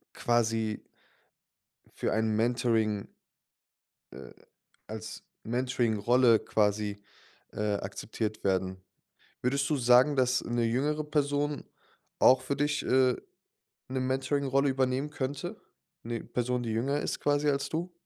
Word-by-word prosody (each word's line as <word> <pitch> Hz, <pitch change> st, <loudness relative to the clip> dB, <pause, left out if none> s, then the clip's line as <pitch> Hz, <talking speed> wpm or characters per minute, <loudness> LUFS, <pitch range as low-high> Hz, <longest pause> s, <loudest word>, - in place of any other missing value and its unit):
quasi 115 Hz, -2 st, 0 dB, 1.1 s
für -, -, -2 dB
ein 110 Hz, -1 st, +1 dB
Mentoring 115 Hz, -3 st, +1 dB, 1.0 s
äh, 65 Hz, -, -10 dB, 0.6 s
als 110 Hz, 0 st, -7 dB, 0.2 s
Mentoringrolle 120 Hz, -1 st, +2 dB
quasi, 105 Hz, -1 st, 0 dB, 0.5 s
äh, 105 Hz, -1 st, -1 dB
akzeptiert 105 Hz, +2 st, -5 dB
werden. 95 Hz, -1 st, 0 dB, 0.6 s
Würdest 140 Hz, +3 st, +1 dB
du 150 Hz, -, +2 dB
sagen, 125 Hz, +3 st, +5 dB
dass 125 Hz, -1 st, +2 dB
'ne 120 Hz, 0 st, 0 dB
jüngere 145 Hz, +6 st, 0 dB
Person 145 Hz, -1 st, -1 dB, 0.5 s
auch 130 Hz, 0 st, +6 dB
für 140 Hz, +2 st, -2 dB
dich, 145 Hz, +1 st, 0 dB
äh, 130 Hz, -1 st, +3 dB, 0.7 s
'ne 130 Hz, 0 st, -2 dB
Mentoringrolle 135 Hz, +1 st, +1 dB
übernehmen 130 Hz, +2 st, 0 dB
könnte? 140 Hz, -1 st, -4 dB, 0.5 s
'Ne 115 Hz, 0 st, -4 dB
Person 125 Hz, 0 st, -2 dB
die 115 Hz, -, -3 dB
jünger 135 Hz, +6 st, 0 dB
ist -, -, -3 dB
quasi 145 Hz, 0 st, +2 dB
als 140 Hz, -1 st, -1 dB
du? 170 Hz, +3 st, -3 dB
125 Hz, 115 wpm, -29 LUFS, 110-140 Hz, 1.1 s, auch